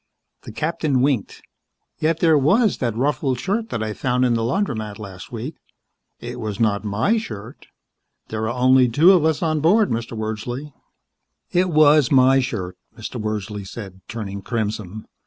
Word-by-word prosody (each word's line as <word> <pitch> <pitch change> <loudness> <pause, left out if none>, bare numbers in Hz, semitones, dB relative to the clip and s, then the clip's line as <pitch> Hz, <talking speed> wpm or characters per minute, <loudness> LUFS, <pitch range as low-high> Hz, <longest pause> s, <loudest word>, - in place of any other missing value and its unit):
The - - -7
captain 150 0 -1
winked. 130 -6 -1 0.6
"Yet 160 +1 0
there 160 -2 +5
was 195 - +3
that 115 -3 -1
ruffled 135 -1 0
shirt 215 - -2
that 115 - -3
I 110 -1 -3
found 125 +2 0
in 120 - +2
the 115 - 0
laundromat 115 - -2
last 95 -4 -10
week. 125 +7 -6 0.6
It - - -7
was 105 -2 -4
not 105 -3 +1
my 110 - +1
shirt. 110 - -9 0.6
There 110 0 -2
are 120 +1 -4
only 130 0 +5
the 115 - -6
two 165 +8 +7
of 180 -5 +4
us 160 +1 +1
aboard, 165 +7 +3
Mr. 115 0 -3
Wordsley." 120 +6 -5 0.8
"It 180 +1 +2
was 150 -3 +5
my 135 0 +5
shirt," 100 -8 -4 0.2
Mr. - - -6
Wordsley 105 -1 -4
said, 95 -1 -9
turning 100 -4 -6
crimson. 110 -2 -4
125 Hz, 160 wpm, -21 LUFS, 110-150 Hz, 0.8 s, two